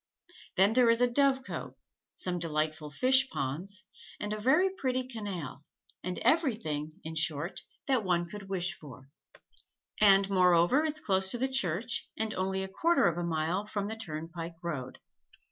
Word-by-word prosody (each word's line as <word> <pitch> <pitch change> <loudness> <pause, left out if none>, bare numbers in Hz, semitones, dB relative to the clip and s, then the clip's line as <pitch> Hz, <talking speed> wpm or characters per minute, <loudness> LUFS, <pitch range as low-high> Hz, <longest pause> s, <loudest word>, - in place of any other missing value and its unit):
Then 195 +3 +4
there 245 -1 +5
is 230 0 +4
a 245 - +5
dovecote, 265 +1 0 0.4
some 180 -1 -3
delightful 155 -1 -2
fish 260 - +4
ponds, 155 +8 -3 0.4
and 210 0 -3
a 215 - -4
very 305 - +3
pretty 260 -8 -1
canal, 195 - -6 0.4
and 180 0 -3
everything, 185 - +1
in 160 - -6
short, 155 +1 0 0.2
that 260 -5 +1
one 175 -2 +1
could 195 +2 -9
wish 180 -2 0
for; 135 -2 -13 0.9
and 195 -2 +6
moreover 180 - +4
it's 305 -1 -2
close 190 -6 +1
to 240 - 0
the 260 +2 0
church 230 -3 0
and 220 -1 -2
only 190 +1 -1
a - - -4
quarter 330 - +2
of 170 - +1
a - - -2
mile 170 +4 -1
from 205 -1 -2
the 220 - -4
turnpike 165 -4 -6
road. 140 -7 -4
190 Hz, 160 wpm, -30 LUFS, 165-235 Hz, 0.9 s, and